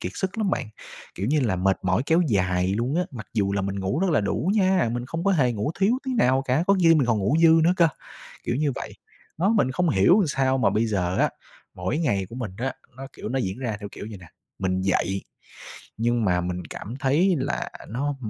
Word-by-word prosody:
kiệt 90 - -4
sức 190 +3 -3
lắm 210 -3 +1
bạn. 115 - -2 0.5
Kiểu 100 - -3
như 150 +3 +2
là 110 -8 0
mệt 95 +1 +1
mỏi 95 +5 +1
kéo 165 +3 +4
dài 95 -3 +1
luôn 125 +7 -1
á, 180 - +2
mặc 115 -5 -8
dù 100 -3 +1
là 100 -1 0
mình 100 0 -3
ngủ 95 - -1
rất 190 -2 +1
là 150 - +3
đủ 130 - -1
nha, 190 - +3
mình 120 0 -3
không 165 +6 -4
có 200 - +3
hề 130 -9 +2
ngủ 115 +8 -2
thiếu 225 +6 +3
tí 260 -1 -2
nào 130 - +3
cả, 135 +5 +1
có 200 - +5
khi 165 -1 +6
mình 140 -5 +2
còn 115 -3 +2
ngủ 105 +9 +1
dư 165 - +8 0.2
nữa 175 - +4
cơ, 170 -1 +5 0.6
kiểu 120 - -1
như 145 0 0
vậy. - - -6 0.5
Đó 190 +5 +2
mình 205 - +2
không 180 +5 +1
hiểu 130 - +5
làm 195 - +3
sao 135 -1 +1
mà - - +3
bây 110 +2 +1
giờ 95 -4 -1
á, - - +3 0.4
mỗi 95 +11 -2
ngày 100 - 0
của 115 - -9
mình 120 -6 -4
á, 135 +3 -2 0.2
nó, 135 +1 -7
kiểu, - - -7
nó 130 +3 -1
diễn 95 -3 -3
ra 120 -5 -3
theo 100 - -6
kiểu - - -8
vầy 105 - -8
nè, 90 - -14 0.3
mình 95 -1 -1
dậy, 95 0 0 0.7
nhưng 120 +1 +1
mà 90 -3 +2
mình 90 0 -4
cảm 110 - -7
thấy 165 +8 +3
là 135 +2 -2 0.2
nó 140 +5 -2
125 Hz, 245 wpm, -24 LUFS, 100-160 Hz, 0.7 s, dư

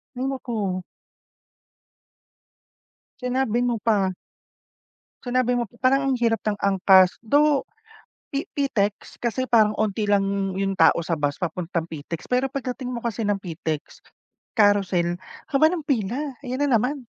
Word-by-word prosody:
Hay 255 - -2
naku! 220 -9 -3 2.4
Sinabi 250 -2 0
mo 240 -2 0
pa. 195 -4 +1 1.1
Sinabi 250 0 +1
mo 240 - +1 0.2
parang 270 +1 +3
ang 260 - +2
hirap 230 -1 +1
ng 210 -1 -1
angkas. 190 -1 +5
Though 290 +4 +3 0.7
pi 280 - -2
Pitex 215 -8 -1
kasi 245 +2 -1
parang 215 -4 +4
'onti 215 0 0
lang 195 -1 +1
yung 195 0 0
tao - - +5
sa 170 - 0
bus 145 -1 0
papuntang 170 -1 -3
Pitex. 160 +2 -6
Pero 255 +2 +2
pagdating 255 -1 -4
mo 235 - -4
kasi 230 -1 -2
ng 205 -1 +1
Pitex, 160 -3 -5 0.6
Carousel, 190 -4 +3 0.3
haba 285 +1 +5
nga-pila. 275 - -2
Ayan 255 +3 -2
na 285 - +1
naman. 250 +7 -1
220 Hz, 130 wpm, -24 LUFS, 195-255 Hz, 2.4 s, angkas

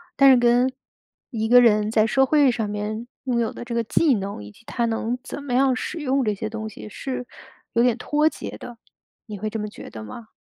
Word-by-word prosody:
但 275 0 +7
是 260 - +7
跟 240 +2 +3 0.6
一 220 -3 -2
个 245 +2 +7
人 215 -2 +4
在 220 -1 +3
社 265 +4 +3
会 285 -1 +4
上 220 -3 -2
面 215 +3 -4 0.2
拥 245 -3 0
有 230 - 0
的 - - -7
这 240 -1 -6
个 235 - +1
技 285 +5 +3
能， 195 - -5
以 105 - -11
及 230 - -21
他 235 -2 -1
能 230 +2 -1
怎 290 - -7
么 255 -3 -4
样 265 0 +4
使 330 +6 -4
用 270 -2 +1
这 210 - +1
些 215 +2 -4
东 220 -1 -5
西， 210 - -10
是 255 +2 -5 0.5
有 235 +1 +3
点 245 -2 +2
脱 300 +4 +1
节 - - -5
的， 240 -1 -10 0.5
你 210 -4 -8
会 215 - -2
这 225 - -4
么 210 - -3
觉 - - -11
得 110 -1 -9
吗？ 220 - -10
235 Hz, 255 characters per minute, -23 LUFS, 215-255 Hz, 0.6 s, 但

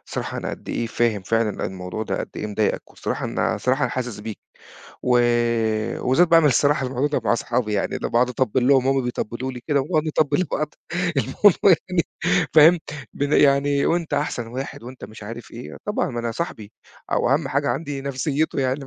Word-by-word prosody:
"الصراحة - - -4
أنا - - -4
قد - - -9
إيه 115 - -2
فاهم 115 -3 0
فعلًا 115 +1 0
الموضوع 90 +3 -5
ده - - -3
قد - - -5
إيه 105 - -3
مضايقك 105 0 -1
والصراحة - - -4
أنا - - 0
الصراحة 130 +2 0
أنا 125 - +1
حاسس 125 -5 -4
بيك" 110 0 -7 0.6
و 125 -1 +3 0.8
وبالذات 165 +8 +3
باعمل 165 -2 +6
الصراحة 140 0 +3
الموضوع 130 +3 -1
ده 145 - -1
مع - - +3
صحابي 120 -2 -1
يعني 100 - -1
أنا - - -3
باقعد 120 +1 +2
أطبّل 125 +1 0
لهم 135 -2 +4
وهُم 135 -1 +2
بيطبّلوا 125 +1 -3
لي 125 - -8
كده 145 -2 +3
ونقعد 155 +2 0
نطبّل 155 +2 +1
لبعض 155 -3 -2 0.4
الموضوع 180 +7 +4
يعني 180 -3 +1 0.5
فاهم؟ 160 +3 +7 0.3
ب - - -6
يعني 140 0 +3
وأنت 165 -3 0
أحسن 140 -5 -2
واحد 130 +1 -6
وأنت 125 +2 -9
مش 110 0 -11
عارف 115 +3 -8
إيه، 120 +2 -9
طبعًا 210 - -1
ما 120 -2 -3
أنا 115 0 -2
صاحبي 110 -11 -5 0.4
أو 120 - +2
أهم 140 0 +1
حاجة 140 +1 0
عندي 145 -4 -3
نفسيته 140 +2 -1
يعني 130 +2 0
130 Hz, 190 wpm, -22 LUFS, 120-145 Hz, 0.8 s, فاهم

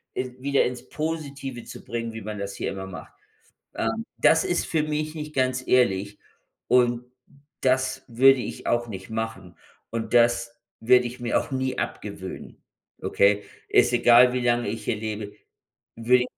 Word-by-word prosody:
äh, 130 0 -3
wieder 140 +1 +2
ins 125 0 -5
Positive 140 -5 -4
zu - - -10
bringen, 115 -1 -4
wie 110 - -7
man 105 0 -6
das 100 0 -5
hier - - -3
immer 95 0 -6
macht. 95 - -10 0.6
Ähm, - - -2
das - - +5
ist - - 0
für 160 -2 +1
mich 155 0 -2
nicht 150 0 -6
ganz 130 -1 0
ehrlich 100 -5 +2 0.5
und 120 -1 +3 0.6
das 130 0 +1
würde 130 +2 +5
ich - - -6
auch 120 0 +1
nicht 95 -2 -8
machen 110 -6 -5 0.3
und 115 +1 -4
das 120 0 +3 0.2
werde 125 +2 +5
ich 120 +1 -7
mir 120 -1 +1
auch - - -5
nie 130 -1 -1
abgewöhnen, - - -6 0.4
okay? 100 +1 +3 0.2
Ist - - +4
egal, 120 +1 +6
wie 125 - -1
lange 120 0 +2
ich 115 - -4
hier 115 - 0
lebe, 105 -1 -5 0.6
würde 125 +2 +3
120 Hz, 160 wpm, -25 LUFS, 110-130 Hz, 0.6 s, egal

